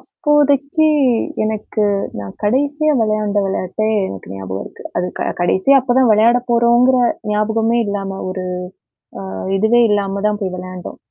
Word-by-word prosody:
அப்போதைக்கு 295 Hz, -1 st, +1 dB, 0.6 s
எனக்கு 215 Hz, 0 st, -2 dB, 0.4 s
நான் 100 Hz, -1 st, -7 dB
கடைசியா 285 Hz, +7 st, +1 dB
விளையாடின 215 Hz, -2 st, 0 dB
விளையாட்டே 195 Hz, +3 st, -2 dB, 0.2 s
எனக்கு 95 Hz, -, -9 dB
ஞாபகம் 95 Hz, 0 st, -5 dB
இருக்கு. -, -, -13 dB
அது 180 Hz, -, 0 dB
க -, -, -1 dB, 0.2 s
கடைசியா 190 Hz, +10 st, +3 dB
அப்பதான் 255 Hz, -1 st, +2 dB
விளையாடப் 235 Hz, +4 st, +3 dB
போறோங்கிற 240 Hz, +2 st, +4 dB, 0.3 s
ஞாபகமே 220 Hz, +2 st, +1 dB
இல்லாம 195 Hz, -1 st, -4 dB
ஒரு 185 Hz, 0 st, -4 dB, 0.8 s
அ -, -, -6 dB, 0.4 s
இதுவே 220 Hz, +4 st, +3 dB
இல்லாமதான் 205 Hz, +1 st, -1 dB
போய் 190 Hz, -2 st, -3 dB
விளையாடினோம். 185 Hz, 0 st, -8 dB
215 Hz, 125 wpm, -17 LUFS, 195-245 Hz, 0.8 s, போறோங்கிற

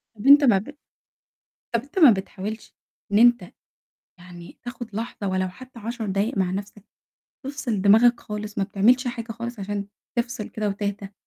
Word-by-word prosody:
طَب 210 Hz, +6 st, -5 dB
أنت 285 Hz, +1 st, +9 dB
ما 230 Hz, -8 st, +5 dB
ب 280 Hz, +10 st, -6 dB, 1.0 s
طَب 230 Hz, -, +2 dB
أنت 285 Hz, +7 st, -5 dB
ما 290 Hz, -8 st, +9 dB
بتحاولش 205 Hz, +2 st, -5 dB, 0.4 s
إن 205 Hz, -, +4 dB
أنت 240 Hz, 0 st, +4 dB, 0.7 s
يعني 175 Hz, -1 st, -13 dB
تاخد 240 Hz, -3 st, -8 dB
لحظة 220 Hz, -2 st, -4 dB
ولو 185 Hz, 0 st, 0 dB
حتى 255 Hz, +6 st, -13 dB
10 230 Hz, +1 st, -5 dB
دقايق 200 Hz, +3 st, -1 dB
مع 185 Hz, -2 st, +1 dB
نَفْسك؟ 200 Hz, +1 st, -6 dB, 0.6 s
تفصِل 260 Hz, -7 st, -3 dB
دماغك 225 Hz, +5 st, +5 dB
خالص، 210 Hz, 0 st, -7 dB
ما 200 Hz, -, +2 dB
بتعملش 220 Hz, +6 st, +3 dB
حاجة 230 Hz, -1 st, -5 dB
خالص 235 Hz, 0 st, -6 dB
عشان 200 Hz, 0 st, -3 dB, 0.3 s
تفصِل 235 Hz, -2 st, -2 dB
كده 215 Hz, -1 st, -3 dB
وتهدى؟ 200 Hz, 0 st, -4 dB
215 Hz, 160 wpm, -24 LUFS, 200-240 Hz, 1.0 s, أنت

